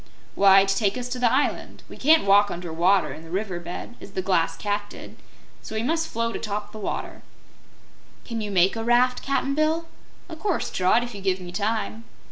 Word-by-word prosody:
"Why, 195 0 +6
to 195 0 0
take 200 +1 0
us 250 -1 -4
to 250 0 -4
the 240 -2 +3
island. 280 +2 -1
We - - -11
can't 315 -2 +4
walk 205 +1 +5
under 175 -2 -6
water, 180 +3 +2
in - - -10
the 165 - -12
river 190 0 -3
bed, 180 +7 -8
as 195 - -11
the 185 - -2
Glass 165 -3 +1
Cat 205 +1 -2
did, - - -11 0.5
so 220 - -8
we 220 - -1
must 325 +5 0
float 230 0 -2
atop 210 -1 -4
the 215 - -9
water." 205 - -5 1.0
"Can 230 -2 -4
you 210 - -4
make 190 0 +3
a 225 - -3
raft, 245 +2 +3
Cap'n 275 0 -1
Bill?" 310 +3 +1 0.4
"O' 335 - -8
course, 360 +2 -2
Trot, 185 +6 +2
if 240 -1 -7
you 200 - -8
give 190 -1 0
me 180 -1 -8
time." 215 +3 -2
210 Hz, 210 wpm, -24 LUFS, 190-245 Hz, 1.0 s, Why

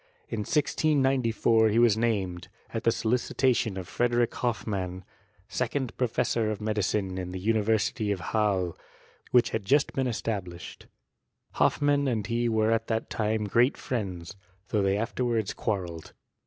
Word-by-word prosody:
In - - -3
1694 135 -7 +2
he 105 - +1
was 120 -3 +5
named, 100 -6 -1 0.3
at 115 - -3
the 115 - +5
solicitation 120 -1 +1
of 90 -2 -5
Frederick 120 -1 +1
Hoffmann, 100 -6 -2 0.4
second 130 -6 -2
professor 115 -2 0
of 110 - -3
medicine 105 -3 -1
in 90 -1 -5
the 95 - -5
University 110 +1 +1
of 100 - -1
Halle, 100 -5 +1 0.5
which 125 -1 +4
had 110 - -2
just 140 +9 +2
been 130 -1 0
esta 115 -3 -2
blished. 90 -1 -11 0.6
Hoffmann 145 -1 +2
and 110 -5 0
he 120 +1 0
were 110 0 +2
at 115 0 0
that 110 -1 -2
time 110 0 0
great 120 +6 +2
friends, 95 -7 -4 0.3
though 105 - +1
they 100 0 +2
afterwards 115 -1 -1
quarrelled. 90 -6 -4
110 Hz, 140 wpm, -28 LUFS, 100-120 Hz, 0.6 s, was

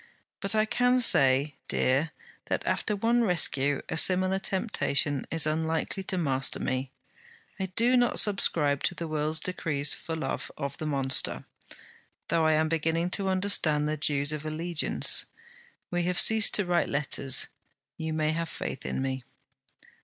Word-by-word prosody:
But 200 +1 -2
I 215 0 +3
can 245 +3 +1
say, 135 - +4
dear, 135 +5 +1 0.4
that - - -3
after 210 - -1
one 235 +4 +1
rescue, 145 -7 +1
a 165 - -4
similar 185 +2 +3
temptation 150 - -1
is 165 -2 +1
unlikely 160 +4 -2
to 185 - -2
master 135 -6 0
me. 130 +1 -3 0.7
I 190 - -2
do 230 +7 +2
not 245 -1 +2
subscribe 150 -8 +2
to 175 - 0
the 170 - -5
world's 155 0 +1
decrees 155 -5 -1
for 165 - -6
love 160 - -4
of 140 -2 -5
the 155 - -4
monster, 135 -3 -1 0.8
though 165 -1 +2
I 155 - +3
am 155 +1 +2
beginning 165 +2 -1
to 195 0 +1
understand 185 -6 +1
the 155 - -1
dues 145 -1 +1
of 155 -1 -5
allegiance. 160 +2 +1 0.6
We 175 0 0
have 180 0 +1
ceased 220 -1 +5
to 205 - +2
write 175 -1 0
letters. 140 -2 +1 0.5
You 160 0 -5
may 155 0 0
have 165 0 -3
faith 135 - -6
in 130 - -3
me.' 130 -1 -4
160 Hz, 155 wpm, -27 LUFS, 145-185 Hz, 0.8 s, ceased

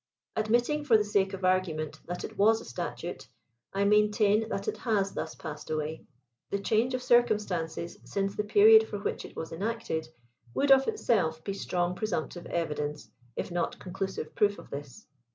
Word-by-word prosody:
Admitting, 240 +7 +1
for 235 -6 +5
the 210 - +1
sake 200 -2 +2
of 190 -1 -3
argument, 160 -4 0
that 175 +1 -4
it - - -6
was 220 +2 +4
a - - -11
statute, 120 - -5 0.4
I 195 +1 0
maintain 210 +1 +3
that 195 - -3
it - - -1
has 205 -5 0
thus - - -4
passed 155 -2 -8
away. 155 0 -3 0.4
The 200 - 0
change 225 +5 +1
of 255 - -4
circumstances 205 - +1
since 195 0 -2
the 210 - 0
period 220 +1 +7
for 205 - -4
which 200 - -3
it - - -12
was 160 - -5
enacted, 190 -4 -3 0.5
would 280 0 +3
of 270 0 +6
itself 200 - +1
be 195 - -3
strong 180 -2 -1
presumptive 180 -3 -3
evidence, 150 -3 -3 0.2
if - - -4
not 175 0 -1
conclusive 190 -3 -5
proof 205 -1 +2
of - - -13
this. 145 +8 -8
200 Hz, 170 wpm, -29 LUFS, 170-220 Hz, 0.5 s, period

